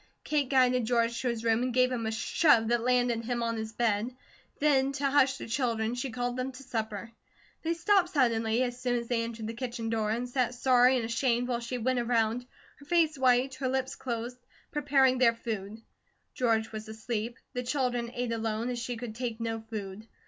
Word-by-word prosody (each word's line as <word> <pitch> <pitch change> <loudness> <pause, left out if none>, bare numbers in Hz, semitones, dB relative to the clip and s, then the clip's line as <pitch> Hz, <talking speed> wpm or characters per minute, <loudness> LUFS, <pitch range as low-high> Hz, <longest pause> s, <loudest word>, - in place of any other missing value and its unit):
Kate 290 -4 0
guided 250 -3 +3
George 235 0 +1
to 255 - -1
his 235 -2 -2
room 225 0 +2
and 250 -1 -1
gave 255 0 +4
him 230 -3 -2
a - - -1
shove 225 +1 +3
that 240 -1 +2
landed 245 -1 +2
him 240 0 -2
on 230 0 -1
his 220 0 -4
bed. 220 0 0 0.5
Then 275 -2 +3
to 275 0 0
hush 270 -1 +4
the - - -7
children 230 -2 -1
she 245 +2 -3
called 245 0 -3
them 255 +1 -2
to 260 +2 -11
supper. 220 -2 -4 0.5
They 335 +1 -1
stopped 370 +1 +3
suddenly, 235 -5 +2
as 245 0 -3
soon 250 -1 0
as 235 0 -4
they 235 -1 +1
entered 230 -1 -5
the 225 - -4
kitchen 235 -2 -4
door, 220 -2 0
and 235 +3 -1
sat, 250 -1 0
sorry 250 0 +5
and 240 -3 0
ashamed 240 +1 0
while 240 -1 0
she 240 +1 -4
went 250 +1 0
around, 235 0 0 0.3
her 285 - -16
face 330 -2 +3
white, 260 0 +3
her 260 - +1
lips 265 +1 -1
closed, 240 0 -4 0.3
preparing 270 -3 +3
their 235 -2 +5
food. 220 -2 -5 0.5
George 225 -3 +1
was 215 0 -6
asleep. 220 +1 -4 0.2
The 250 - -2
children 245 -2 -1
ate 245 -1 -2
alone, 225 +1 -1
as 245 - -3
she 235 0 -4
could 230 -2 -6
take 235 -1 -4
no 225 -1 -2
food. 215 -1 -7
240 Hz, 205 wpm, -29 LUFS, 225-255 Hz, 0.5 s, sorry